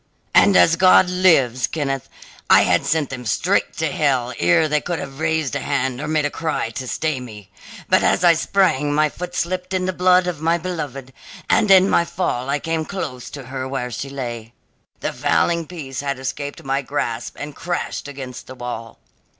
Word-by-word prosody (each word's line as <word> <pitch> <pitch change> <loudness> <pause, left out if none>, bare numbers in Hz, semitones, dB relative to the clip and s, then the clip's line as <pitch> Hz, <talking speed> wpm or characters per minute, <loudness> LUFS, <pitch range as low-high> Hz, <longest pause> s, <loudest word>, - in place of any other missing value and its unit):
And, 200 - +6
as 165 0 +5
God 185 0 +6
lives, 140 -10 +3
Kenneth, 135 -4 -3 0.4
I - - +7
had - - +2
sent 155 -4 0
them 125 -2 -6
straight 110 - 0
to - - -1
hell 130 -5 0
ere 85 - +4
they 150 0 +1
could 175 -1 -3
have 135 -1 -7
raised 160 -3 0
a - - 0
hand 135 -2 -1
or 150 - -4
made 155 -1 +1
a 145 - -1
cry 155 -8 -2
to 130 +2 -6
stay 155 +1 -1
me. 105 -6 -11 0.4
But - - +4
as - - +2
I 175 -1 +7
sprang 155 -5 +1
my 155 0 +3
foot 180 +4 -7
slipped 185 +2 -2
in 185 0 0
the 185 - -1
blood 180 0 +4
of 175 -4 -4
my 165 +1 +2
beloved, 145 -7 -6 0.3
and 210 - +3
in 190 -1 +7
my 170 - +3
fall 140 -8 -2
I 140 - +1
came 165 +1 -2
close 130 -9 -6
to 145 - -8
her 130 +1 -5
where 130 -2 -4
she 135 +4 -5
lay. 120 -4 -6 0.5
The - - -2
fowling 170 -2 +1
piece 140 -7 -7
had 140 -1 -2
escaped 140 +2 -5
my 135 +1 -1
grasp 120 -4 -4
and 145 -1 -7
crashed 175 -4 -4
against 135 -3 -8
the 130 - -9
wall. 120 -2 -7
145 Hz, 195 wpm, -21 LUFS, 130-170 Hz, 0.5 s, I